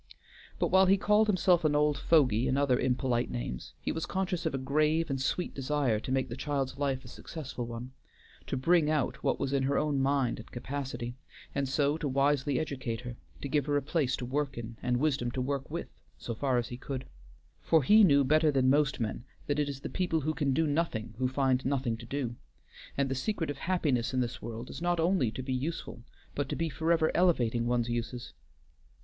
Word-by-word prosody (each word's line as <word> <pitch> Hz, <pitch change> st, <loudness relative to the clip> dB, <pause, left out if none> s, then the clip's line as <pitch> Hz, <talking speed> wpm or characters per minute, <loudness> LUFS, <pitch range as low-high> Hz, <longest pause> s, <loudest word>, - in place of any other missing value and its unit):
But -, -, +1 dB
while 190 Hz, 0 st, +6 dB
he 195 Hz, +1 st, +5 dB
called 210 Hz, +2 st, +3 dB
himself 185 Hz, -4 st, +3 dB
an 150 Hz, -1 st, +2 dB
old 150 Hz, 0 st, +3 dB
fogy 135 Hz, -6 st, +3 dB
and 130 Hz, -, +1 dB
other 140 Hz, -3 st, +3 dB
impolite 125 Hz, -1 st, 0 dB
names -, -, -5 dB
he -, -, -2 dB
was 160 Hz, -, -3 dB
conscious 185 Hz, -3 st, -1 dB
of 155 Hz, -, -2 dB
a -, -, 0 dB
grave 150 Hz, +4 st, +1 dB
and 135 Hz, -1 st, -1 dB
sweet 175 Hz, +6 st, -1 dB
desire 135 Hz, -4 st, 0 dB
to 130 Hz, -, -6 dB
make 130 Hz, 0 st, +1 dB
the 120 Hz, -, -6 dB
child's 140 Hz, -1 st, -2 dB
life 135 Hz, -2 st, -1 dB
a -, -, -9 dB
successful 130 Hz, -2 st, -7 dB
one, 120 Hz, +2 st, -7 dB, 0.6 s
to -, -, -2 dB
bring 160 Hz, +3 st, +3 dB
out 150 Hz, -4 st, 0 dB
what -, -, +1 dB
was 140 Hz, 0 st, -1 dB
in 140 Hz, -, +2 dB
her 135 Hz, +1 st, +1 dB
own 150 Hz, -2 st, +1 dB
mind 135 Hz, -3 st, +1 dB
and 115 Hz, -, -11 dB
capacity, 130 Hz, -1 st, -5 dB, 0.4 s
and 140 Hz, -2 st, -1 dB
so 145 Hz, +2 st, +1 dB
to 150 Hz, -, -1 dB
wisely 140 Hz, 0 st, +2 dB
educate 130 Hz, -7 st, -3 dB
her, 120 Hz, -1 st, -7 dB, 0.3 s
to -, -, -3 dB
give 145 Hz, 0 st, 0 dB
her 145 Hz, -1 st, +2 dB
a -, -, +1 dB
place 145 Hz, -2 st, 0 dB
to 125 Hz, -, -5 dB
work 140 Hz, +2 st, -2 dB
in, 115 Hz, 0 st, -6 dB
and 125 Hz, 0 st, +1 dB
wisdom 135 Hz, -3 st, +1 dB
to 125 Hz, -, -4 dB
work 135 Hz, +1 st, -2 dB
with, -, -, -4 dB, 0.3 s
so 115 Hz, -, -5 dB
far 130 Hz, +2 st, 0 dB
as 120 Hz, -1 st, -1 dB
he 120 Hz, -, -6 dB
could; 130 Hz, 0 st, -5 dB, 0.6 s
for 160 Hz, -3 st, +3 dB
he 215 Hz, +11 st, +7 dB
knew 140 Hz, -6 st, +6 dB
better 155 Hz, +3 st, +4 dB
than 130 Hz, -2 st, +3 dB
most 145 Hz, -1 st, +2 dB
men 115 Hz, 0 st, -3 dB, 0.2 s
that 145 Hz, 0 st, 0 dB
it 145 Hz, -1 st, +1 dB
is 135 Hz, -1 st, -6 dB
the -, -, -4 dB
people 175 Hz, -4 st, 0 dB
who 155 Hz, +2 st, -1 dB
can 145 Hz, -3 st, 0 dB
do 160 Hz, +5 st, +2 dB
nothing 145 Hz, -8 st, -1 dB
who 130 Hz, -, +2 dB
find 130 Hz, -1 st, +1 dB
nothing 130 Hz, -4 st, 0 dB
to 115 Hz, 0 st, -11 dB
do, 125 Hz, -3 st, -3 dB, 0.6 s
and 140 Hz, -1 st, +2 dB
the 135 Hz, -, -1 dB
secret 160 Hz, +3 st, -2 dB
of 140 Hz, -, -8 dB
happiness 135 Hz, -8 st, 0 dB
in -, -, +2 dB
this 120 Hz, -2 st, -2 dB
world 115 Hz, +2 st, -6 dB
is -, -, -8 dB
not 175 Hz, 0 st, +1 dB
only 165 Hz, -, +2 dB
to 130 Hz, +4 st, -6 dB
be 130 Hz, 0 st, -2 dB
useful, 130 Hz, -2 st, -4 dB, 0.3 s
but 145 Hz, -, -2 dB
to -, -, -1 dB
be 165 Hz, 0 st, -1 dB
forever 160 Hz, +2 st, +2 dB
elevating 120 Hz, -10 st, +2 dB
one's 120 Hz, -1 st, +1 dB
uses. 120 Hz, +1 st, -4 dB
140 Hz, 220 wpm, -30 LUFS, 125-155 Hz, 0.6 s, he